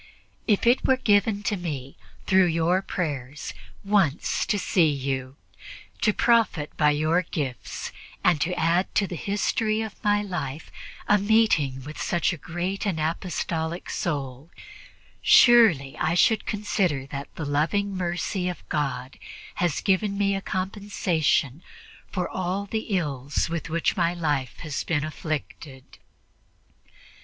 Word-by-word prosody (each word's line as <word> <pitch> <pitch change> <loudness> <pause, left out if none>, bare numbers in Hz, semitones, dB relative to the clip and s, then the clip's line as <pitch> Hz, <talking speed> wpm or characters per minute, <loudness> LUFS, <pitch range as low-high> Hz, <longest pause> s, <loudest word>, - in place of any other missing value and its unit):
If 210 -2 +2
it 240 +2 +4
were 260 - +3
given 205 -3 +2
to 210 - 0
me, 145 -8 -5 0.3
through 190 -1 +5
your 170 +3 +2
prayers, 150 -7 -4 0.3
once 195 -7 +1
to 205 +1 +1
see 175 -4 +3
you, 135 -2 -3 0.7
to 210 - +4
profit 220 -10 +2
by 150 -1 +4
your 155 +4 +2
gifts 145 -7 -5 0.3
and 165 -5 +3
to 180 +3 0
add 170 +3 +1
to 200 - +3
the 180 - -6
history 215 +4 0
of 220 -2 -9
my 205 0 +2
life 155 -7 -5 0.4
a 210 - +5
meeting 195 -11 +2
with 150 +3 -8
such 175 +1 +1
a - - -6
great 175 +5 -4
and 175 -5 -1
apostolic 165 +1 -2
soul, 140 -2 -3 0.7
surely 215 - +6
I 165 - +1
should 220 +5 +3
consider 190 -9 0
that 140 -1 -5
the 160 - -4
loving 170 +8 0
mercy 180 +1 -2
of 175 - -8
God 135 -4 -3 0.4
has 175 -5 +1
given 200 +1 +1
me 200 -1 +2
a 195 - -2
compensation 185 - -1 0.5
for 180 -2 -2
all 185 +2 -2
the 220 +2 -3
ills 145 -1 -2
with 165 -2 -3
which 165 +1 0
my 170 -1 +1
life 145 -7 -1
has 155 -3 -3
been 150 -3 0
afflicted." 155 -3 -6
170 Hz, 135 wpm, -25 LUFS, 150-200 Hz, 0.7 s, surely